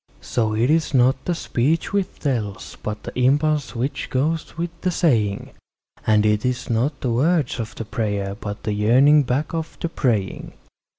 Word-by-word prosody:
So 110 -3 -1
it 120 +6 +2
is 160 -3 +1
not 130 +1 +3
the 175 - 0
speech 155 +5 0
which 200 -2 -1
tells, 110 -9 -3
but 105 0 -5
the - - -7
impulse 145 +2 +2
which 125 +5 -3
goes 150 +5 -1
with 170 0 -2
the 185 - +1
saying; 115 - +1 0.6
And 105 -1 +4
it 105 0 +2
is 125 -1 -2
not 130 +5 0
the 125 - 0
words 145 +2 +1
of 110 -2 -5
the 115 - -5
prayer, 105 -3 -2
but 105 0 -7
the 105 - -1
yearning 130 +8 +5
back 140 +5 -1
of 165 -1 -4
the 170 - -2
praying. 110 - -1
125 Hz, 175 wpm, -22 LUFS, 110-155 Hz, 0.6 s, yearning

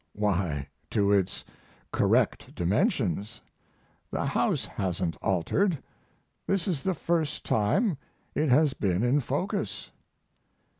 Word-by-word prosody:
Why, 90 -9 0 0.2
to 100 -1 +2
its 100 -3 +1 0.5
correct - - +2
dimensions; 105 - 0 0.7
the - - -2
house - - +1
hasn't 90 -3 -2
altered; 125 - +1 0.7
this 195 -2 +1
is 165 -8 0
the 190 +3 0
first 165 -3 -1
time 135 - +2 0.3
it 150 0 +1
has 145 +2 +5
been 100 -5 0
in 125 +4 +3
focus. 185 - -2
115 Hz, 105 wpm, -28 LUFS, -, 0.7 s, has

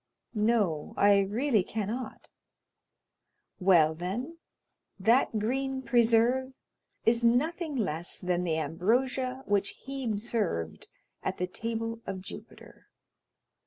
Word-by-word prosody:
"No, 210 -8 +1
I 200 0 +6
really 215 +4 +2
cannot." 220 +5 -5 1.3
"Well, 175 -5 +5
then, 225 - -4 0.6
that 225 +3 +3
green 265 +4 -1
preserve 240 +2 +3 0.5
is 230 +1 +3
nothing 300 +7 +1
less 175 - -2
than 180 -1 -1
the 165 -3 0
ambrosia 250 - 0
which 200 -1 0
Hebe 260 -6 -2
served 200 - -2 0.3
at - - -3
the 180 - 0
table 230 +4 -4
of 195 -1 -3
Jupiter." - - -12
225 Hz, 100 wpm, -29 LUFS, 190-255 Hz, 1.3 s, I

